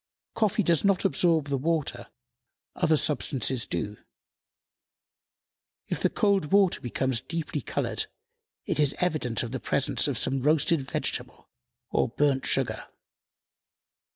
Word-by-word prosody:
Coffee 215 Hz, -1 st, +1 dB
does 170 Hz, -3 st, +2 dB
not 195 Hz, -2 st, +2 dB
absorb 160 Hz, 0 st, +2 dB
the 140 Hz, -1 st, 0 dB
water; 150 Hz, -5 st, -1 dB, 0.7 s
other 160 Hz, -3 st, +2 dB
substances 135 Hz, -4 st, 0 dB
do.... 105 Hz, -1 st, -3 dB, 1.9 s
If -, -, -2 dB
the -, -, +2 dB
cold 200 Hz, -5 st, +1 dB
water 195 Hz, -2 st, +3 dB
becomes 125 Hz, 0 st, -1 dB
deeply 155 Hz, +1 st, -4 dB
colored, -, -, -2 dB, 0.6 s
it -, -, -2 dB
is 145 Hz, -2 st, +3 dB
evidence 155 Hz, -, 0 dB
of 115 Hz, -, -5 dB
the 130 Hz, -, -3 dB
presence -, -, +2 dB
of -, -, -2 dB
some 135 Hz, 0 st, +1 dB
roasted 155 Hz, +2 st, +2 dB
vegetable 135 Hz, -, -4 dB, 0.4 s
or -, -, +1 dB
burnt 135 Hz, +2 st, +1 dB
sugar. 120 Hz, -5 st, 0 dB
145 Hz, 125 wpm, -27 LUFS, 130-170 Hz, 1.9 s, water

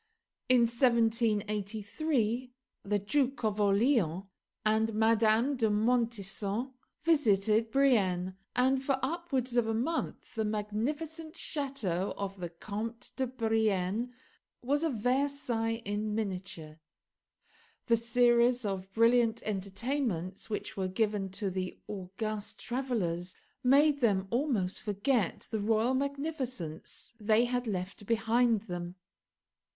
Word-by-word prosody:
In 255 Hz, -1 st, +6 dB
1783 230 Hz, +1 st, +1 dB, 0.3 s
the 205 Hz, +1 st, 0 dB
Duke 265 Hz, +6 st, 0 dB
of 210 Hz, -1 st, +1 dB
Orleans 200 Hz, -, +3 dB, 0.4 s
and 220 Hz, 0 st, +2 dB
Madame 225 Hz, +4 st, +3 dB
de 225 Hz, -4 st, +2 dB
Montesson 220 Hz, +1 st, 0 dB, 0.3 s
visited 225 Hz, -8 st, +3 dB
Brienne; 195 Hz, -9 st, +2 dB, 0.2 s
and, 260 Hz, +1 st, +3 dB
for 270 Hz, -1 st, +1 dB
upwards 270 Hz, -5 st, -1 dB
of 235 Hz, -2 st, +3 dB
a 225 Hz, -, 0 dB
month, 290 Hz, +9 st, -2 dB
the 220 Hz, -, -1 dB
magnificent 290 Hz, -, -3 dB
chateau 230 Hz, -, -2 dB
of 195 Hz, -1 st, -4 dB
the 175 Hz, -1 st, -4 dB
Comte 215 Hz, +7 st, -6 dB
de 260 Hz, -1 st, 0 dB
Brienne 220 Hz, -2 st, 0 dB, 0.5 s
was 285 Hz, +4 st, +1 dB
a 330 Hz, -, +1 dB
Versailles 245 Hz, -2 st, 0 dB
in 210 Hz, +1 st, -2 dB
miniature. 180 Hz, -7 st, -4 dB, 1.1 s
The 230 Hz, -1 st, +4 dB
series 240 Hz, +1 st, +3 dB
of 195 Hz, -1 st, -3 dB
brilliant 230 Hz, 0 st, +3 dB
entertainments 200 Hz, -, -2 dB
which 215 Hz, 0 st, -4 dB
were 190 Hz, -2 st, -1 dB
given 205 Hz, 0 st, 0 dB
to 195 Hz, -1 st, -2 dB
the 185 Hz, 0 st, -4 dB
august 210 Hz, +2 st, -5 dB
travellers 200 Hz, -9 st, -2 dB, 0.3 s
made 285 Hz, +3 st, +5 dB
them 200 Hz, -6 st, +2 dB
almost 235 Hz, -8 st, 0 dB
forget 210 Hz, 0 st, 0 dB
the 220 Hz, -, -1 dB
royal 220 Hz, +4 st, +2 dB
magnificence 265 Hz, -, -3 dB
they 215 Hz, +2 st, +3 dB
had 245 Hz, 0 st, -1 dB
left 195 Hz, 0 st, -4 dB
behind 230 Hz, 0 st, +3 dB
them. 175 Hz, -3 st, -6 dB
225 Hz, 110 wpm, -31 LUFS, 200-250 Hz, 1.1 s, In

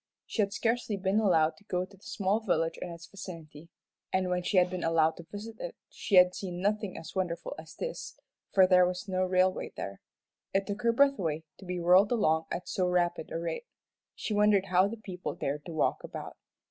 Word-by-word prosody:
She 220 Hz, -, -1 dB
had 200 Hz, -1 st, +1 dB
scarcely 225 Hz, 0 st, 0 dB
been 195 Hz, +2 st, +1 dB
allowed 165 Hz, -7 st, +3 dB
to 205 Hz, -, -20 dB
go 180 Hz, -2 st, -1 dB
to 195 Hz, +1 st, -18 dB
the 195 Hz, -, -25 dB
small 200 Hz, +1 st, 0 dB
village 165 Hz, -7 st, 0 dB
in 180 Hz, -, -4 dB
its 170 Hz, -1 st, -9 dB
vicinity, 165 Hz, -5 st, -10 dB, 0.4 s
and 185 Hz, -1 st, +1 dB
when 180 Hz, 0 st, +1 dB
she 185 Hz, +2 st, 0 dB
had 180 Hz, 0 st, +6 dB
been 180 Hz, 0 st, -4 dB
allowed 160 Hz, -1 st, +3 dB
to 170 Hz, -, -9 dB
visit 220 Hz, +2 st, -7 dB
it -, -, -5 dB, 0.2 s
she 200 Hz, -, -1 dB
had 180 Hz, 0 st, +7 dB
seen 180 Hz, -2 st, -5 dB
nothing 205 Hz, 0 st, -1 dB
as -, -, -9 dB
wonderful 175 Hz, -3 st, -2 dB
as 160 Hz, 0 st, -11 dB
this, -, -, -5 dB, 0.3 s
for 190 Hz, -1 st, +6 dB
there 180 Hz, -1 st, +6 dB
was 180 Hz, +3 st, -4 dB
no 185 Hz, -1 st, 0 dB
railway 185 Hz, 0 st, +1 dB
there. 100 Hz, 0 st, -6 dB, 0.5 s
It 195 Hz, 0 st, +2 dB
took 205 Hz, +2 st, -4 dB
her 235 Hz, -1 st, +3 dB
breath 275 Hz, +2 st, +4 dB
away 160 Hz, -3 st, -1 dB, 0.2 s
to 190 Hz, -, -11 dB
be 180 Hz, 0 st, -3 dB
whirled 180 Hz, +5 st, +5 dB
along 160 Hz, -9 st, +2 dB
at 180 Hz, -, -4 dB
so 185 Hz, -1 st, 0 dB
rapid 175 Hz, -2 st, 0 dB
a -, -, -2 dB
rate. 470 Hz, -, -4 dB, 0.5 s
She 215 Hz, -, -3 dB
wondered 205 Hz, -2 st, +4 dB
how 185 Hz, +2 st, +5 dB
the 230 Hz, +3 st, -6 dB
people 185 Hz, -4 st, -6 dB
dared 145 Hz, +1 st, -3 dB
to -, -, -6 dB
walk 160 Hz, -, 0 dB
about. -, -, -7 dB
185 Hz, 215 wpm, -30 LUFS, 170-205 Hz, 0.5 s, had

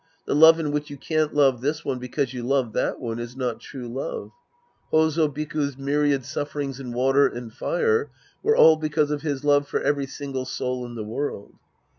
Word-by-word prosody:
The -, -, -1 dB
love 160 Hz, +2 st, +7 dB
in 150 Hz, -2 st, -1 dB
which 150 Hz, +1 st, -2 dB
you 145 Hz, -, -8 dB
can't 155 Hz, +2 st, 0 dB
love 135 Hz, -4 st, +3 dB
this 150 Hz, +4 st, -2 dB
one 130 Hz, -2 st, -2 dB
because 125 Hz, +1 st, -2 dB
you 125 Hz, -, -4 dB
love 125 Hz, -2 st, 0 dB
that -, -, -1 dB
one 115 Hz, -2 st, -4 dB
is 120 Hz, +2 st, -7 dB
not 125 Hz, -3 st, -2 dB
true 125 Hz, -3 st, -8 dB
love. 125 Hz, +3 st, -5 dB, 0.6 s
H6z5 160 Hz, -1 st, +3 dB
Biku's 150 Hz, -2 st, -2 dB
myriad 140 Hz, -1 st, +1 dB
sufferings 145 Hz, -2 st, -4 dB
in 125 Hz, -3 st, -6 dB
v/ater 135 Hz, +3 st, +3 dB
and 120 Hz, -2 st, -7 dB
fire 455 Hz, -, 0 dB, 0.3 s
were 445 Hz, +1 st, +2 dB
all 160 Hz, 0 st, +8 dB
because 155 Hz, -1 st, 0 dB
of 150 Hz, -1 st, -2 dB
his 145 Hz, -2 st, -3 dB
love 145 Hz, -1 st, +3 dB
for -, -, -1 dB
every 140 Hz, -1 st, 0 dB
single 135 Hz, -2 st, -5 dB
soul 125 Hz, -1 st, -3 dB
in 120 Hz, -, -9 dB
the 110 Hz, -, -4 dB
world. 110 Hz, -1 st, -4 dB
140 Hz, 195 wpm, -24 LUFS, 125-150 Hz, 0.6 s, all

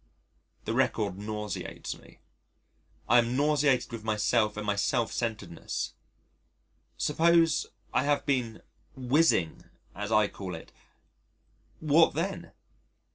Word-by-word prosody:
The -, -, -1 dB
record 90 Hz, -, 0 dB
nauseates 105 Hz, 0 st, -5 dB
me. -, -, -18 dB, 0.9 s
I 120 Hz, -, +6 dB
am 120 Hz, +2 st, 0 dB
nauseated 145 Hz, -3 st, +2 dB
with 115 Hz, -2 st, -6 dB
myself 110 Hz, 0 st, +1 dB
and 105 Hz, -, -4 dB
my 105 Hz, -1 st, +1 dB
self 115 Hz, +3 st, 0 dB
centredness.... 105 Hz, -8 st, -4 dB, 1.0 s
Suppose 165 Hz, +1 st, +3 dB, 0.3 s
I -, -, +3 dB
have 145 Hz, 0 st, +1 dB
been 125 Hz, -6 st, -1 dB, 0.3 s
"whizzing" 130 Hz, -, +2 dB, 0.3 s
as 105 Hz, +2 st, -5 dB
I 105 Hz, -1 st, +4 dB
call 95 Hz, -4 st, -7 dB
it 80 Hz, -, -11 dB, 1.1 s
what 160 Hz, +1 st, +4 dB
then? -, -, -3 dB
115 Hz, 110 wpm, -29 LUFS, 105-145 Hz, 1.1 s, I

